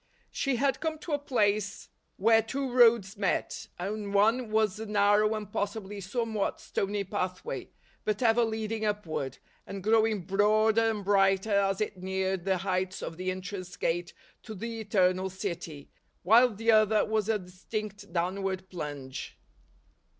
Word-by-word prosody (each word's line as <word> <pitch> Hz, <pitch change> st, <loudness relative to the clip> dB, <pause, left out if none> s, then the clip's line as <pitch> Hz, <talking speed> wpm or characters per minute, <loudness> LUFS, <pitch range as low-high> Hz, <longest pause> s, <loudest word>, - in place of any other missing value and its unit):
She 275 Hz, -2 st, 0 dB
had 270 Hz, +2 st, +1 dB
come 320 Hz, +1 st, -2 dB
to 315 Hz, -, -8 dB
a 290 Hz, -, +1 dB
place 210 Hz, -7 st, 0 dB, 0.3 s
where 225 Hz, +3 st, +5 dB
two 265 Hz, +4 st, -3 dB
roads 230 Hz, -5 st, +4 dB
met, 200 Hz, -3 st, -1 dB
and 200 Hz, +2 st, -4 dB
one 225 Hz, +4 st, +3 dB
was 215 Hz, -1 st, +1 dB
a 220 Hz, -, -5 dB
narrow 210 Hz, +1 st, +3 dB
and 210 Hz, -1 st, -7 dB
possibly 205 Hz, 0 st, -3 dB
somewhat 220 Hz, +1 st, -2 dB
stony 200 Hz, +1 st, -2 dB
pathway, 190 Hz, -, -4 dB, 0.3 s
but 215 Hz, +3 st, -1 dB
ever 235 Hz, 0 st, +4 dB
leading 220 Hz, 0 st, -2 dB
upward, 170 Hz, -11 st, -2 dB, 0.3 s
and 195 Hz, -1 st, -6 dB
growing 220 Hz, -1 st, +3 dB
broader 215 Hz, +3 st, +3 dB
and 210 Hz, -3 st, -3 dB
brighter 195 Hz, +1 st, +3 dB
as 195 Hz, 0 st, +2 dB
it 210 Hz, -2 st, -2 dB
neared 190 Hz, -1 st, -2 dB
the 190 Hz, -1 st, +2 dB
heights 185 Hz, 0 st, -2 dB
of 165 Hz, -, -6 dB
the 185 Hz, +1 st, -2 dB
entrance 185 Hz, 0 st, -5 dB
gate 175 Hz, +1 st, -1 dB, 0.3 s
to 220 Hz, -2 st, -8 dB
the 230 Hz, +3 st, -5 dB
Eternal 190 Hz, -3 st, +2 dB
City; 170 Hz, -5 st, -6 dB, 0.3 s
while 230 Hz, +7 st, +6 dB
the 225 Hz, +1 st, +1 dB
other 215 Hz, -1 st, +4 dB
was 215 Hz, -1 st, 0 dB
a 220 Hz, -, +3 dB
distinct 200 Hz, +2 st, -7 dB
downward 190 Hz, +2 st, -2 dB
plunge. 145 Hz, -6 st, -6 dB
205 Hz, 150 wpm, -29 LUFS, 190-220 Hz, 0.3 s, while